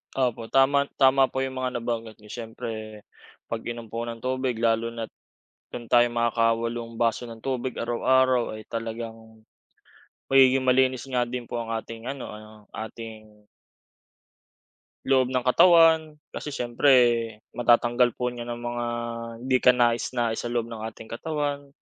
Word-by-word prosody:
Opo, 120 -3 -1
tama 140 +1 +3
tama 135 0 +5
po 130 0 -2
yung 130 -1 -4
mga 130 -1 -2
nabanggit 115 -2 -4
niyo. 105 - -12
Siyempre 115 0 -6 0.8
pag-inom 115 0 -5
po 115 - -4
ng 115 0 -7
tubig 130 -1 -1
lalo 115 0 +2
na't, 115 -1 -6 0.6
kung 120 -1 -7
tayo'y 120 0 +4
makaka-walong 115 0 0
baso 115 +1 0
ng 115 - -9
tubig 130 -1 -3
araw-araw 125 0 +2
ay 110 - -12
talagang 115 -1 -7 0.9
magiging 130 -1 +6
malinis 130 0 +2
nga 125 -2 0
din 125 0 -4
po 120 0 -4
ang 115 0 -5
ating 115 +2 -7
ano, 135 -1 -5
ang 105 0 -11 0.2
ating 110 -1 -9 1.6
loob 130 -2 +3
ng 130 -1 -1
katawan, 160 +1 +5 0.2
kasi 150 - -5
siyempre 125 +1 0 0.6
matatanggal 120 0 +3
po 125 - -1
niyan 120 0 -7
ang 120 0 -5
mga 120 0 -2 0.6
hindi 130 -1 +3
kanais-nais 120 -1 +2
sa 120 - -4
loob 120 -1 -1
ng 115 -2 -8
ating 115 - -13
katawan 145 +1 -3
120 Hz, 140 wpm, -25 LUFS, 115-130 Hz, 1.6 s, magiging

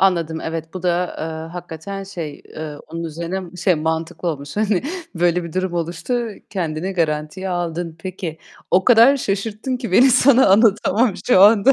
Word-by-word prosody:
Anladım. 170 -4 +2
Evet, 160 +1 -5
bu 185 - -6
da, 180 0 0
eee, 160 0 -5
hakikaten 175 +3 -7
şey, 170 -6 -7
eee, 155 -1 -7
onun 165 0 -6
üzerine 170 +3 -5
şey 180 +1 +2
mantıklı 160 +2 -2
olmuş. 145 +1 -5
Hani, 210 -3 +1 0.3
böyle 175 +1 +1
bir 170 - -8
durum 185 0 -1
oluştu 175 +8 -2 0.2
kendini 175 0 -3
garantiye 160 +2 -2
aldın. 175 -2 -3
Peki, 180 -4 -5 0.3
o 185 +1 +4
kadar 245 +3 +7
şaşırttın 215 +2 -2
ki 240 -7 -6
beni 260 +7 +6
sana 260 +1 +5
anlatamam 215 +2 +3
şu 245 - +5
anda. 215 +5 +7
180 Hz, 160 wpm, -20 LUFS, 165-200 Hz, 0.3 s, kadar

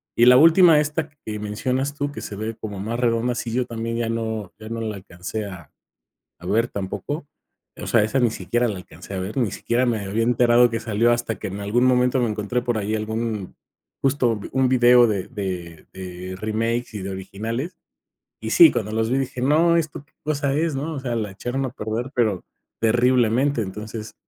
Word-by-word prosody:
y 120 - +5
la 125 0 +8
última, 165 +1 +7
esta 150 +1 -1
que 110 -8 -7
mencionas 125 +7 -2
tú, 145 0 -2
que - - -7
se 105 - -6
ve 110 +2 -4
como 105 -3 -7
más 115 +4 -3
redonda, 120 0 +1
sí, 115 0 -4
yo 125 +1 +1
también 115 0 -3
ya 115 -1 -1
no 110 -4 -3
ya 110 - -9
no 115 0 -4
la 110 -2 -3
alcancé 95 +3 -6
a 95 -5 -10 0.7
a 85 - -11
ver 115 +5 +2
tampoco. 105 - -4 0.6
O - - -5
sea, 115 -3 +4
esa 130 +5 0
ni 120 -2 +3
siquiera 120 +2 -1
la 105 - -3
alcancé 90 +1 -10
a - - -2
ver, 95 +4 -5
ni 120 -6 +1
siquiera 120 +6 0
me 120 -3 +1
había 100 +4 -1
enterado 120 +1 +4
que 115 - -1
salió, 110 +1 +2
hasta 120 -1 0
que 105 - -3
en 95 +1 -6
algún 105 +5 +1
momento 125 0 +3
me 120 - +1
encontré 105 +3 -2
por 120 -2 -1
ahí, 105 +1 -2
algún 110 -2 -3 0.5
justo 130 -5 +2
un 130 0 +2
video 125 -1 +6
de 100 -4 -1
de 90 -5 -5
de 90 0 -7
remakes 115 +3 -2
y 105 - -5
de 95 - -4
originales. 110 - -5 0.6
Y - - -4
sí, 335 -2 +8
cuando 105 -1 -3
los 110 +1 0
vi, 130 - +2
dije: 130 -2 -3
"No, 160 +6 +4
esto 155 -3 -2
qué 150 - -37
cosa 145 -2 0
es," 155 -1 0
¿no? 155 +4 -3
O 140 - -4
sea, 120 -3 -2
la 105 -3 -3
echaron 125 +7 -3
a 130 - -2
perder, 115 +2 -4
pero 110 -7 +1 0.4
terriblemente. 120 +2 +3
Entonces, 105 +2 -7
115 Hz, 205 wpm, -23 LUFS, 105-125 Hz, 0.7 s, la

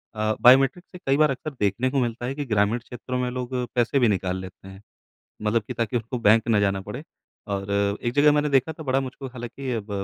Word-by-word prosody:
अ, 110 0 0
biometric 135 +7 +5
से 180 - -10
कई 135 +1 +3
बार 150 -1 +4
अक्सर 145 +3 -5
देखने 105 +6 +1
को 140 - +1
मिलता 120 0 -2
है 130 +2 -3
कि 145 0 -4
ग्रामीण 105 0 +1
क्षेत्रों 125 +1 -6
में 125 0 -1
लोग 125 0 -4 0.2
पैसे 120 +3 +2
भी 125 - +4
निकाल 95 -2 -1
लेते 95 +1 -11
हैं। 95 0 -12 0.6
मतलब 110 +2 +1
कि - - -4
ताकि 115 +1 -1
उसको 120 +2 -3
बैंक 115 0 +4
ना 110 -3 +3
जाना 100 -1 +1
पड़े 105 +8 -7 0.5
और 100 0 -4 0.3
एक 120 - -1
जगह 145 +1 +5
मैंने 150 0 +2
देखा 135 +3 +2
था 160 - -10
बड़ा 135 -1 +1
मुझको 135 +1 -6
हालाँकि 125 +2 -7
अब 110 -2 -5
120 Hz, 225 wpm, -24 LUFS, 105-135 Hz, 0.6 s, biometric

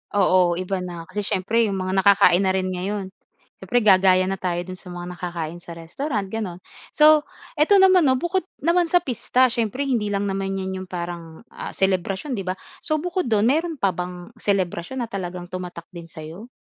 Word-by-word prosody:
Oo, 185 -3 +4
iba 185 +2 -2
na. 175 -2 -6
Kasi 185 +5 -6
siyempre 210 +3 +1
'yong 200 - -2
mga 185 0 0
nakakain 190 -2 +5
na 190 -1 +2
rin 185 0 -1
ngayon. 190 +2 -3 0.5
Siyempre 245 -1 +1
gagaya 185 -2 +5
na 195 - -2
tayo 175 -2 -2
do'n 185 +1 -8
sa - - -13
mga 175 0 -6
nakakain 170 -2 -5
sa 170 0 -10
restaurant 195 - -4
gano'n. 190 -5 -5 0.3
So 305 0 +6 0.3
eto 320 +7 +5
naman 375 -3 +6
'no 260 - +4
bukod 345 +6 -1 0.2
naman 340 +2 +3
sa 355 +1 +3
pista 255 -2 +2
siyempre 230 +4 -1
hindi 245 -6 0
lang 200 0 -1
naman 195 0 -2
'yan 190 0 -3
'yong 185 - -8
parang, 170 -1 -6
ah, - - -7
selebrasyon, 195 - -1
'di 195 - -5
ba? 185 - -1 0.2
So 310 -1 -1
bukod 360 -3 -1
do'n 215 -3 +2
mayro'n 325 +4 0
pa 195 - +3
bang 180 +2 -6
selebrasyon 195 +4 -1
na 230 - -6
talagang 180 -2 -5
tumatak 180 -2 -7
din 170 -2 -10
sa'yo? 160 +7 -10
190 Hz, 190 wpm, -23 LUFS, 180-240 Hz, 0.5 s, So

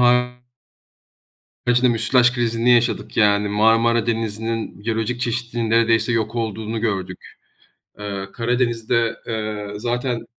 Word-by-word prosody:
ha 125 0 +3 1.3
ya, 125 - +4
işte, 125 +1 +3
müsilaj 120 +2 +3
krizini 120 0 +1
yaşadık 120 -1 +1
yani 105 -1 +3
Marmara 115 +2 +3
Denizi'nin 115 -2 -3
biyolojik 115 +2 -2
çeşitliliğin 120 -2 -2
neredeyse 115 +1 +3
yok 110 -1 -1
olduğunu 110 -1 -3
gördük. 95 -5 -2 0.8
Eee, 100 -2 -5
Karadeniz'de, 115 -1 0
eee, 105 -2 -4
zaten 120 +1 -2
115 Hz, 110 wpm, -21 LUFS, 110-120 Hz, 1.3 s, ya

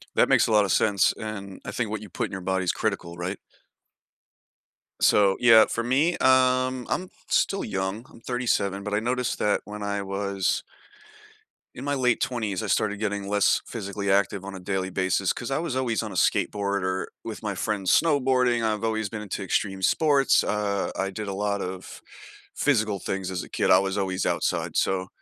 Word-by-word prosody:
That - - +4
makes - - +4
a - - -2
lotta 105 -3 +4
sense 100 +2 +3
and 100 -3 -7
I - - -4
think 115 -3 -2
what 110 -1 -4
you 105 - -10
put 95 - -2
in - - -9
your 95 -1 -5
body 95 +1 -1
is 90 - +2
critical, 85 0 -3
right? 90 +3 -4 1.6
So, 100 -2 +4
yeah, 115 -3 +7
for 115 - -3
me, 140 +8 +2
um, 130 -1 +3
I'm 185 0 -2 0.2
still 195 - +1
young, 95 +4 -3
I'm - - -16
37 115 -6 -1
but 105 - -4
I 105 - +2
noticed 125 +2 -1
that 105 - +1
when 105 0 -8
I 100 0 -2
was 100 -1 -1 1.1
in 130 - -7
my 145 - 0
late 125 -4 +2
20s, 110 -7 -2
I - - -4
started 105 -1 0
getting 100 -2 -2
less 100 -1 +3
physically 100 -3 -3
active 100 0 +1
on 100 0 -7
a - - -7
daily 95 0 -2
basis 95 0 0
'cause 120 - -5
I 135 - +1
was 170 -5 -3
always 120 -4 0
on 105 - -6
a - - -8
skateboard 100 +1 +1
or 95 0 -2
with 115 -1 -7
my 105 -3 -3
friends 100 -2 +1
snowboarding, 130 -6 +2
I've 110 0 -1
always 110 -1 0
been 105 +1 -6
into 100 -1 -5
extreme 95 0 -1
sports, 140 - +3
uh, 100 -2 -1
I 95 0 -1
did 105 +1 -5
a 95 - -3
lot 100 0 -1
of 95 0 -7 0.5
physical 110 -8 +1
things 95 0 -3
as 90 -2 -3
a - - -12
kid, - - 0
I - - +8
was 95 +1 -2
always 95 -1 -1
outside, - - -1
so, 95 -1 +1
105 Hz, 195 wpm, -25 LUFS, 95-115 Hz, 1.6 s, I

